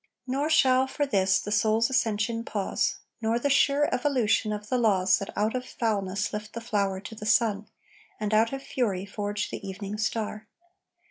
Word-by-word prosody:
Nor 275 +4 -1
shall, 260 -4 +4
for 290 +2 -1
this, 195 -7 +2
the 210 - -6
soul's 215 +2 +3
ascension 230 -2 0
pause, 205 -4 -1 0.3
Nor 225 +1 +1
the 280 +4 0
sure 280 +1 +4
evolution 245 -5 +1
of 210 0 -5
the 250 +3 0
laws 190 -5 +3
That 195 - -5
out 215 +3 +1
of 255 - -2
foulness 200 -5 -2
lift 210 0 -5
the 230 - -4
flower 200 -4 -1
to 215 +1 -9
sun, 215 -1 +2 0.5
And 215 0 -2
out 225 +1 +4
of 270 0 -5
fury 200 -7 -1
forge 205 +1 -3
the - - -5
evening 200 +2 -6
star. 215 -1 -2
215 Hz, 175 wpm, -27 LUFS, 205-240 Hz, 0.5 s, shall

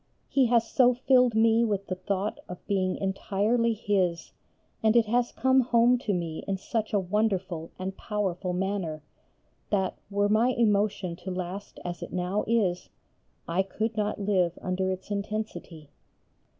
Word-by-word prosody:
He 265 -3 +3
has 230 -1 +3
so 250 -1 +4
filled 250 -2 +3
me 225 +1 +4
with 200 -3 -1
the - - -3
thought 195 +2 -2
of 180 - -9
being 190 -2 0
entirely 210 +4 0
His, 190 -6 -1 0.5
and 220 +1 +3
it 235 -1 +5
has 240 +2 +1
come 260 0 +3
home 240 0 +4
to 220 - -2
me 170 -4 -3
in 195 -1 -1
such 220 +3 -3
a 205 - +2
wonderful 185 -4 -1
and 190 +1 -4
powerful 190 -4 -2
manner, 180 -4 -2 0.7
that, 190 -3 0
were 205 0 +1
my 225 +5 +3
emotion 205 -5 +1
to 190 - -7
last 185 +2 -5
as 175 -1 -5
it - - -7
now 185 +3 -1
is, 195 -6 +1 0.6
I 170 +3 +1
could 215 +3 -3
not 210 -1 -1
live 185 -4 +1
under 185 +1 -1
its 190 +2 -5
intensity. 200 -7 -5
200 Hz, 155 wpm, -27 LUFS, 185-225 Hz, 0.7 s, it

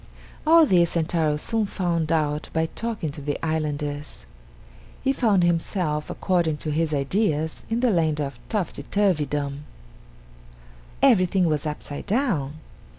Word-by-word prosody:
All 330 0 +7
this 175 - +3
Sentaro 160 -2 +1
soon 220 +6 -1
found 170 -4 -1
out 150 -1 0
by 160 0 +1
talking 215 -3 -4
to 145 - -9
the 145 +1 -2
islanders. 150 - -3 0.8
He 270 0 +2
found 210 -9 +3
himself, 165 -2 0
according 170 -5 0
to 155 - -1
his 160 +1 0
ideas, 155 +2 0
in 230 +2 0
the 250 -2 +3
land 160 -4 +1
of 140 -4 -4
Topsy 205 -5 -2
turvydom. 150 -8 0 1.4
Everything 185 -2 +4
was 155 -1 0
upside 150 +1 -6
down. 200 - 0
160 Hz, 130 wpm, -24 LUFS, 150-190 Hz, 1.4 s, All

